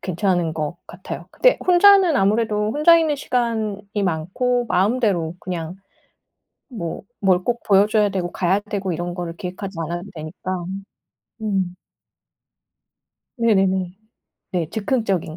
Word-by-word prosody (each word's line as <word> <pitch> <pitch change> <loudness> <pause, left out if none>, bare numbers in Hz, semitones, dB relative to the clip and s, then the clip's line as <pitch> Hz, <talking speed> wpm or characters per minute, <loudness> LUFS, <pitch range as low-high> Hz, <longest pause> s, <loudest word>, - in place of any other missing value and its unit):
괜찮은 175 -3 0
것 155 +2 -4
같아요. 180 +2 -8
근데 - - +3
혼자는 365 -3 +6
아무래도 210 +1 +1
혼자 305 +4 +6
있는 315 -2 +1
시간이 215 -5 -2
많고 215 +9 0
마음대로 190 -4 +1
그냥 175 -1 -5 0.9
뭐 170 -9 -5 0.2
뭘 185 -2 +2
꼭 240 -1 -1
보여 200 0 +5
줘야 210 -1 +2
되고 185 -3 -3
가야 190 +2 +1
되고 200 -2 -4
이런 175 +1 -3
거를 175 -2 -5
계획하지 190 0 -6
않아도 175 +4 -5
되니까. 175 +3 -5 0.8
음. 190 -4 -1 1.6
네네네. 190 -5 +1 0.6
네. 170 -4 -1
즉흥적인 200 -8 -1
195 Hz, 260 characters per minute, -21 LUFS, 175-225 Hz, 1.6 s, 혼자는